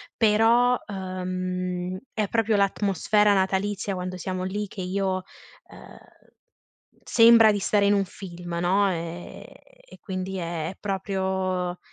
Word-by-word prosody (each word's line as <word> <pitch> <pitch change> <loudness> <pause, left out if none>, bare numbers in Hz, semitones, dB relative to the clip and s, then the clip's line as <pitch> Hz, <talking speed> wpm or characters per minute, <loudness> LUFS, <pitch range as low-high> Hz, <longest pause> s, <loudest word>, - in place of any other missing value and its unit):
però, 230 +3 +4
uhm, 185 -1 -4 0.2
è 215 -2 -1
proprio 225 +1 +1
l'atmosfera 205 +1 +2
natalizia 195 +1 0
quando 180 0 -5
siamo 185 0 -4
lì 205 +3 -3
che 190 - -8
io 185 0 -1 0.5
ehm, - - -13 1.1
sembra 230 -1 +6
di 205 - -1
stare 200 +1 +2
in 205 - +4
un 200 -1 +2
film, 175 -2 -8
no, 195 +2 +2
ehm, 170 0 -6
e - - -18
quindi 190 -1 -5
è 165 -2 -3
è 190 - -10
proprio 190 -2 -2
190 Hz, 125 wpm, -25 LUFS, 185-205 Hz, 1.1 s, sembra